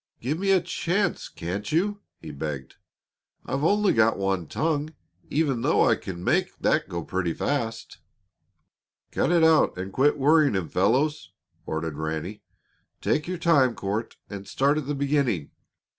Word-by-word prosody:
"Give 145 +7 -2
me 195 +1 0
a 190 -1 +6
chance, 180 +2 -1
can't 90 - -5
you?" 205 +6 0 0.2
he - - -9
begged. 70 -2 -6 0.7
"I've 140 +2 -2
only 205 +4 +3
got 115 0 +3
one 95 -4 -1
tongue, 155 - -1 0.3
even 140 -6 0
though - - +3
I - - +4
can 90 -2 -7
make - - +1
that - - +1
go 85 -1 -4
pretty 90 -2 -2
fast." 115 -6 -3 1.1
"Cut 145 - +1
it 170 -2 +4
out 160 - +4
and 95 +1 -5
quit 145 +3 +3
worrying 145 -2 +4
him, 90 -4 -2
fellows," 130 +11 +1 0.3
ordered 80 -1 -3
Ranny. 80 +6 -4 0.6
"Take 150 - 0
your 180 0 -3
time, 145 -8 +3
Court, 105 +4 -3
and 100 -1 -8
start 140 +3 +2
at 145 - -7
the 145 - -1
beginning. 140 - 0
130 Hz, 155 wpm, -25 LUFS, 95-155 Hz, 1.1 s, a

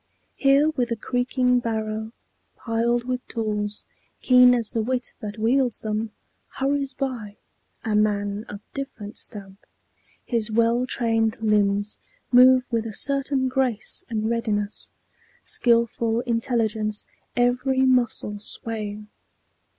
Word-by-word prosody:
Here 275 +2 +4
with 255 -6 -1
a 230 - 0
creaking 250 +2 +1
barrow, 220 -1 -3 0.4
piled 235 +1 0
with 250 0 -3
tools 210 -2 -3 0.3
Keen 250 -1 +6
as 230 -3 -1
the 225 - 0
wit 250 +2 -2
that 210 -2 -6
wields 245 +2 +1
them, 215 +1 -2 0.5
hurries 275 0 0
by 245 -7 -4 0.5
A 220 - 0
man 205 -1 +1
of 205 0 -8
different 265 -7 -6
stamp. 195 -2 -5 0.7
His 230 -3 -1
well 235 +3 +2
trained 225 -3 0
limbs 205 -1 +1 0.3
Move 255 +1 +7
with 230 -1 0
a 215 - -7
certain 275 -1 +1
grace 255 -4 -1
and 220 -1 -1
readiness, 215 -3 -2 0.5
Skilful 235 -1 +2
intelligence 230 -3 0 0.3
every 250 +2 +2
muscle 245 -5 +2
swaying. 210 -1 -5
230 Hz, 115 wpm, -24 LUFS, 215-250 Hz, 0.7 s, Move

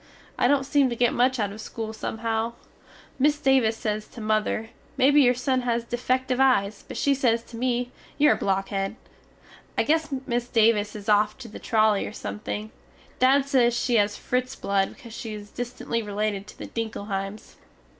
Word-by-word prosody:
I - - +2
dont 270 0 +2
seem 280 -1 +3
to 240 - -3
get 240 0 +2
much 255 +2 +2
out 205 -3 -1
of 215 +2 -8
school 220 0 -5
somehow. 225 +1 -2 0.7
Miss 295 +2 +3
Davis 265 -6 +3
sez 215 -1 -3
to - - -12
mother, 215 +1 0 0.3
Mebbe 275 +2 +5
your 250 -3 +5
son 255 +1 0
has 235 -1 0
deefective 255 +2 -1
eyes 215 -6 +2
but - - -7
she 280 - +3
sez 235 -4 +1
to 235 - -13
me, 245 +1 -1 0.3
You 300 0 +5
are - - +6
a - - -1
blockhed. 195 +1 -1 0.8
I - - +3
guess 315 0 +1
miss 240 -1 -1
Davis 220 -3 +3
is 205 -1 -8
off 210 0 +3
the 235 -5 -9
trolly 215 -2 +2
or - - -8
something, 105 +1 -5 0.5
Dad 270 +2 +4
sez 250 -4 +3
she 240 -2 +2
has 205 0 +2
Fritz 255 +1 -2
blood 195 -1 0
because 235 -3 -12
she 220 -1 -6
is 205 0 -10
distently 240 -1 -3
related 210 -1 -2
to - - -13
the - - -7
Dinkelheims. 205 -2 -5
230 Hz, 180 wpm, -25 LUFS, 210-255 Hz, 0.8 s, are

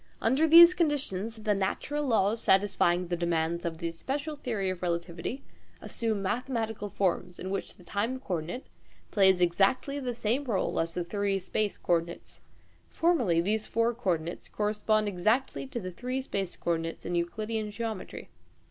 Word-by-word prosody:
Under 265 +8 +3
these 340 +2 +10
conditions, 270 - -1
the 210 -1 +2
natural 205 +9 -1
laws 220 -1 +2
satisfying 190 -2 +3
the 175 - 0
demands 170 0 -1
of 165 -1 -3
the 170 0 -3
(special) 280 - -4
theory 220 -9 -2
of 185 - -7
relativity 170 +8 -3 0.4
assume 220 -4 -2
mathematical 225 -1 -2
forms, 180 -2 -1
in 185 - -5
which 195 - -4
the 180 - -17
time 225 +8 -2
co 195 - -5
ordinate 175 +10 -4 0.5
plays 190 -3 +4
exactly 200 +11 +2
the 250 -3 -3
same 240 +5 0
role 220 -7 0
as 165 0 -1
the 180 - -1
three 200 +2 -1
space 205 +2 -2
co - - 0
ordinates. 170 0 -3 0.5
Formally, 245 - +2
these 215 +4 -1
four 230 +1 +1
co 200 -7 +1
ordinates 165 +2 -7
correspond 215 0 +1
exactly 215 +9 0
to 260 -3 -4
the 185 -3 -5
three 250 +8 -3
space 195 -8 -3
co 170 - -1
ordinates 165 0 -3
in 175 - -3
Euclidean 215 +6 -2
geometry. 220 -2 -5
205 Hz, 165 wpm, -29 LUFS, 175-240 Hz, 0.5 s, these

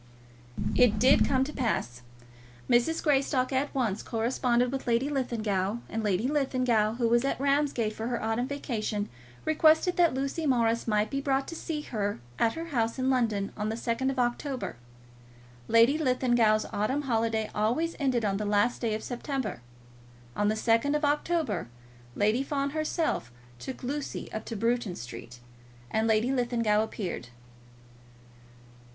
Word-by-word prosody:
It 245 -4 +5
did 260 +2 +5
come 265 -1 +2
to 300 +3 -5
pass. 125 - -2 0.7
Mrs. 240 +7 +2
Greystock 270 -3 +2
at 270 +2 0
once 225 -6 0
corresponded 240 +1 0
with 270 -1 -4
Lady 240 +4 +2
Linlithgow, 220 -7 -1
and 225 - -2
Lady 205 +3 +1
Linlithgow, 255 -6 +1
who 235 -1 +1
was 235 +1 +3
at 275 - -1
Ramsgate 275 -5 +1
for 220 +1 -4
her 240 -1 -1
autumn 225 +3 -1
vacation, 220 -7 -3 0.4
requested 315 +3 +4
that 340 -6 +4
Lucy 275 +4 -2
Morris 230 -3 +2
might 210 -1 +1
be 275 - -1
brought 270 -1 0
to 330 - -6
see 315 -2 -4
her 205 -7 -3 0.2
at 225 - +3
her 330 +1 -6
house 230 -5 0
in 260 0 +1
London 220 -6 0
on 210 0 -2
the 220 - -2
2nd 235 +3 -1
of 270 - -3
October. 250 - -2 0.9
Lady 230 +7 +5
Linlithgow's 240 -6 +2
autumn 260 +8 0
holiday 225 -3 0
always 245 +11 0
ended 255 -5 +1
on 195 -1 0
the 210 - -3
last 205 +4 +1
day 225 -3 0
of 215 - -5
September. 245 - -4 0.7
On 205 - +1
the 215 - +2
2nd 230 +6 +2
of 300 0 +1
October 290 - 0 0.5
Lady 215 +5 +2
Fawn 275 0 -1
herself 310 - -1 0.3
took 260 - -7
Lucy 280 +3 -4
up 215 - -4
to 230 - -5
Bruton 230 -3 0
Street, 120 0 -9 0.5
and 220 +1 +1
Lady 220 +3 +2
Linlithgow 235 -4 +1
appeared. 195 - -4
240 Hz, 155 wpm, -28 LUFS, 220-275 Hz, 0.9 s, It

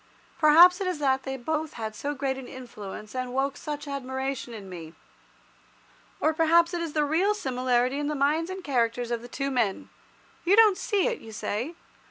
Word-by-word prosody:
Perhaps 340 +4 +7
it 380 - -1
is 365 -3 -1
that 265 -2 +1
they 265 0 -5
both 310 +4 -3
had 220 -2 -5
so 290 +1 -3
great 270 -1 -1
an 260 -1 -8
influence, 215 -5 -9
and 255 -1 -4
woke 270 +1 0
such 295 0 -6
admiration 265 -2 -4
in 210 -4 -8
me. 165 -3 -9 1.2
Or 315 - +2
perhaps 335 +2 +4
it 345 - -2
is 330 -3 -4
the 300 -1 +2
real 360 +8 +2
similarity 255 -4 0
in 295 - -2
the 300 - -1
minds 300 +5 +1
and 375 0 -6
characters 240 -3 0
of 235 -1 -1
the 240 - -9
two 275 +2 -3
men. 230 -7 -1 0.5
You 370 +4 +4
don't 435 -3 +7
see 400 0 0
it, 485 -2 -1
you 225 - -11
say? 225 +8 -3
275 Hz, 195 wpm, -27 LUFS, 245-320 Hz, 1.2 s, Perhaps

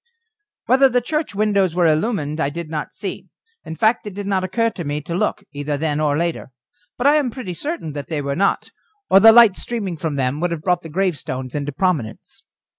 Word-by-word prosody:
Whether 265 +2 +5
the 250 0 +2
church 300 -1 -3
windows 200 -4 +1
were 175 -1 +3
illumined 155 -2 0
I 140 - +1
did 165 +1 -7
not 150 -2 -4
see - - -6 0.4
in 160 - -7
fact, 220 +6 +1
it 200 - -7
did 205 0 -5
not 195 -2 0
occur 230 +5 0
to 175 - -6
me 145 0 -2
to 165 - -6
look, 175 - -1
either 145 0 -3
then 150 0 -1
or 145 -1 +1
later 170 -3 -2 0.5
but 245 - -3
I 290 +2 +6
am 285 -4 +1
pretty 225 -7 -6
certain 285 - -5
that 145 -1 -6
they 155 -3 -2
were 140 0 -2
not, 195 +4 0 0.4
or 195 - +8
the 225 +3 +9
light 225 -4 +7
streaming 200 -8 -4
from 155 -1 -3
them 135 +1 -1
would 175 +2 0
have 165 -2 -5
brought 180 -2 +1
the 165 - -10
gravestones 150 -7 -2
into 145 0 -3
prominence. 145 - -2
175 Hz, 215 wpm, -20 LUFS, 150-215 Hz, 0.5 s, the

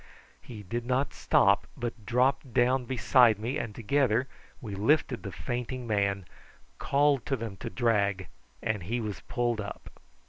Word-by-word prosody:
He 110 -4 -10
did 115 +6 -3
not 130 +3 0
stop, - - +3
but 115 -4 -5
dropped 130 +1 +1
down 125 +1 +3
beside 120 -2 +4
me, 120 +7 -2
and 105 -3 -5
together 125 +1 +1 0.3
we 110 -7 -7
lifted 125 +5 +1
the 100 - -6
fainting 120 +8 -4
man, 100 -3 0 0.5
called 140 -2 +2
to 135 - +1
them 115 -5 -6
to - - -5
drag, 100 -6 +1 0.4
and 110 -3 -1
he 115 +8 -2
was 105 -3 -5
pulled 120 -3 0
up. 100 - -9
120 Hz, 150 wpm, -29 LUFS, 105-130 Hz, 0.5 s, beside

